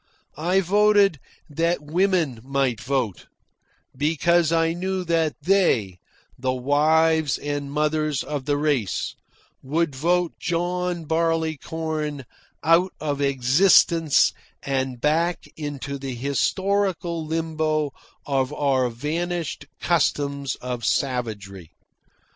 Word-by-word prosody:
I 180 +4 +2
voted 200 -2 +4 0.3
that 165 +3 0
women 165 - +1
might 135 -5 0
vote, 125 -4 -2 0.7
because 165 +3 +2
I 165 0 +2
knew 185 +1 -2
that 165 -3 +1
they, 125 - +2 0.4
the 130 0 0
wives 155 +3 +2
and 145 -1 -4
mothers 150 -1 0
of 145 -3 -4
the 145 -1 +1
race, 145 -9 0 0.5
would 155 +3 -1
vote 175 +4 +1
John 175 0 -2
Barleycorn 160 -2 -2 0.4
out 170 +4 +4
of 145 -2 -2
existence 145 +4 +4 0.3
and 130 -2 -2
back 165 +5 +1
into 140 -2 -5
the 135 -2 -5
historical 175 +5 0
limbo 155 -2 -1 0.3
of 135 -1 0
our 135 -4 +1
vanished 165 +7 -3
customs 140 -5 0
of 125 -2 -5
savagery. 105 - -2
155 Hz, 100 wpm, -23 LUFS, 135-170 Hz, 0.7 s, voted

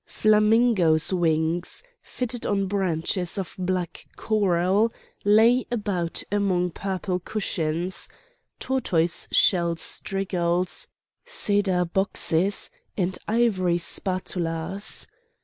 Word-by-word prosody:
Flamingoes' 215 -6 +3
wings, 165 - 0 0.2
fitted 250 -1 -4
on 195 -1 0
branches 185 -1 -1
of 190 -4 -4
black 180 -2 -3
coral, 200 +1 +2 0.3
lay 225 +5 +4
about 200 -7 -2
among 185 -3 +1
purple 185 0 -3
cushions, 180 -3 -2 0.5
tortoiseshell 175 -6 +1
strigils, 180 -1 -2 0.4
cedar 195 -3 +1
boxes, 190 0 +1 0.3
and 185 -1 -1
ivory 205 -6 +2
spatulas. 180 0 -2
185 Hz, 80 wpm, -25 LUFS, 175-205 Hz, 0.5 s, lay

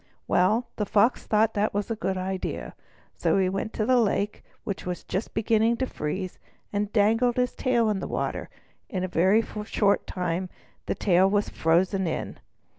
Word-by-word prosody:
Well, 210 +7 +3
the 210 - 0
Fox 225 +4 +2
thought 220 +1 +3
that 210 +1 +1
a 205 +3 -1
good 190 -3 -2
idea. 185 0 -4 0.4
So - - +1
he 190 -1 +2
went 195 +3 -3
to 215 - -1
the 255 +1 +4
lake, 210 -2 0 0.2
which 200 - -4
was 180 -1 -4
just 195 +5 -4
beginning 225 +1 +2
to 260 - 0
freeze, 185 -2 -4 0.3
and 205 0 -1
dangled 225 +3 +3
his 250 0 +1
tail 240 -3 +1
in 210 -2 0
the - - -4
water. - - -3 0.4
In 185 -1 -2
a - - 0
very 185 +5 +3 0.2
short 205 -1 +1
time 180 0 -2 0.4
the - - 0
tail 190 0 +3
was 205 +1 +1
frozen 180 +3 +1
in. 160 - -4
205 Hz, 175 wpm, -26 LUFS, 185-225 Hz, 0.4 s, the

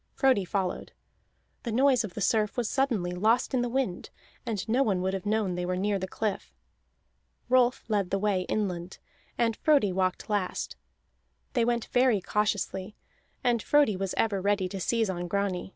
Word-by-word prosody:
Frodi 260 -7 +3
followed. 185 -1 -3 0.7
The 235 - -4
noise 255 +1 +3
of 205 -5 -7
the 210 - -4
surf 210 +2 +1
was 240 -3 0
suddenly 230 -11 0
lost 220 +9 +1
in 255 - +2
the 245 - -1
wind, 245 -8 -2 0.4
and 210 -5 -2
no 240 +4 +2
one 195 -8 +1
would 190 +1 0
have 195 +1 -4
known 210 -3 +1
they 180 0 -3
were 180 +1 -1
near 200 +1 0
the 190 - -3
cliff. 210 +1 -3 0.9
Rolf 250 -1 +3
led 205 -4 0
the 195 - 0
way 200 -2 +1
inland, 185 -4 -2 0.4
and 230 -2 +1
Frodi 280 -10 +3
walked 185 0 -1
last; 205 -3 -2 0.8
they 240 - +2
went 235 -1 0
very 245 -4 +3
cautiously, 205 0 -1 0.5
and 240 -3 +2
Frodi 290 -6 +3
was 190 0 -3
ever 205 -4 +1
ready 200 -1 +1
to 195 - -5
seize 225 +4 +1
on 175 -2 -3
Grani. 195 -1 -1
205 Hz, 175 wpm, -28 LUFS, 190-235 Hz, 0.9 s, Frodi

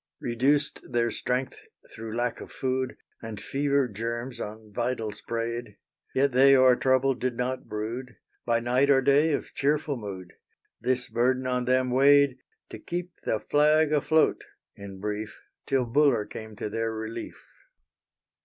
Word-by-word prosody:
Reduced 140 +5 +1
their 120 -1 +1
strength 125 +1 -2 0.3
through 110 0 -6
lack 120 0 -1
of - - -10
food, 130 0 -2 0.2
And 110 -2 -7
fever 140 +3 0
germs 120 +3 -5
on 105 0 -8
vitals 115 -2 -2
preyed; 115 -2 -4 0.4
Yet 140 +1 +3
they 135 +2 +6
o'er 130 -1 +6
trouble 130 +1 +2
did 125 -1 -3
not 130 +1 -3
brood, 115 +4 -5 0.3
By 115 0 +1
night 125 +4 +2
or 135 -1 +5
day 145 +4 +4
of - - -3
cheerful 145 0 0
mood; 95 -5 -8 0.5
This 125 -1 -1
burden 130 +2 +1
on 125 -1 0
them 130 0 +2
weighed 140 0 +5 0.3
To - - -7
keep 175 +1 -5
the 110 - 0
flag 150 +3 +3
afloat 155 +2 +2 0.3
in 100 -1 -10
brief, 105 +1 -4 0.3
Till 130 -2 +1
Buller 130 -3 +3
came 110 +1 -9
to 105 - -4
their 115 +1 -2
relief. 110 +1 -7
125 Hz, 145 wpm, -27 LUFS, 115-135 Hz, 0.5 s, they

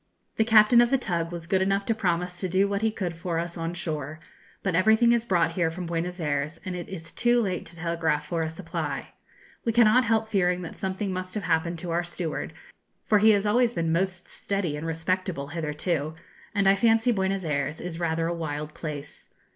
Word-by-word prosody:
The 220 - +4
captain 220 +1 +6
of 240 - +3
the 270 - +3
tug 170 -8 -2
was 170 -1 -6
good 190 +2 +1
enough 195 +1 +1
to 225 - +2
promise 180 -3 -1
to 185 - -2
do 190 +3 +3
what 200 0 -1
he 220 - +3
could 185 -5 -3
for 170 0 -3
us 170 +1 -3
on 165 0 -3
shore; 155 -3 -4 0.4
but 195 - 0
everything 220 +6 +5
is 235 -1 +2
brought 170 -5 +2
here 165 -1 +1
from 175 +2 -6
Buenos 170 +2 -3
Ayres, 150 +1 -2
and 185 -1 -3
it 175 - -6
is 165 -4 -7
too 240 0 +3
late 190 -6 -2
to 165 - -10
telegraph 165 -2 -1
for 170 -2 -2
a 160 - -1
supply. 165 +1 -4 0.5
We 230 - +1
cannot 235 +2 +5
help 220 0 +2
fearing 180 -4 +1
that 165 - -7
something 190 +1 -3
must 185 +1 -5
have 210 - -2
happened 170 0 0
to 170 +1 -5
our 170 +1 +1
steward, 170 -2 -4 0.5
for 210 - +4
he 220 +2 +6
has 205 -1 +4
always 240 +2 +3
been 165 -1 0
most 185 +2 -1
steady 195 -7 -2
and 150 +2 -5
respectable 165 -2 -2
hitherto, 155 0 -2 0.4
and 200 -1 +3
I 195 - +6
fancy 225 +3 +3
Buenos 190 -2 0
Ayres 145 0 -1
is 175 -1 -6
rather 165 -1 0
a 170 - 0
wild 150 -2 -4
place. 150 -3 -7
180 Hz, 210 wpm, -26 LUFS, 165-200 Hz, 0.5 s, captain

